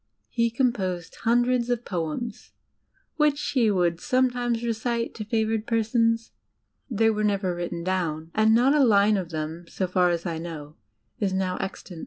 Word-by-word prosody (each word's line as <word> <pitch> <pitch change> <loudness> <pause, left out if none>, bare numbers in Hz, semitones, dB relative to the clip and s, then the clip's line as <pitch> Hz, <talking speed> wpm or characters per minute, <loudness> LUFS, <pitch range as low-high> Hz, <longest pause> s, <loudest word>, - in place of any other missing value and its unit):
He 235 -1 +1
composed 195 -9 -1
hundreds 240 +1 +2
of 245 -1 -1
poems, 180 +6 -4 0.6
which 300 -2 +3
he 240 -5 +3
would 175 -4 +1
somedmes 245 - 0
recite 235 +1 -1
to 215 - -6
favoured 220 0 0
persons. 230 0 +1 0.6
They 225 -1 +3
were 215 0 -1
never 200 -3 +1
written 175 -1 -4
down, 165 -3 -2
and 220 +1 +4
not 255 +4 +4
a 295 -2 +4
line 210 -3 +5
of 185 -4 -2
them, 160 +1 -5
so 190 - -2
far 180 0 +2
as 170 0 -1
I 165 -2 -3
know, 155 -3 -7 0.4
is 195 -2 0
now 185 -1 -1
extant. 185 -2 -6
215 Hz, 160 wpm, -25 LUFS, 175-235 Hz, 0.6 s, line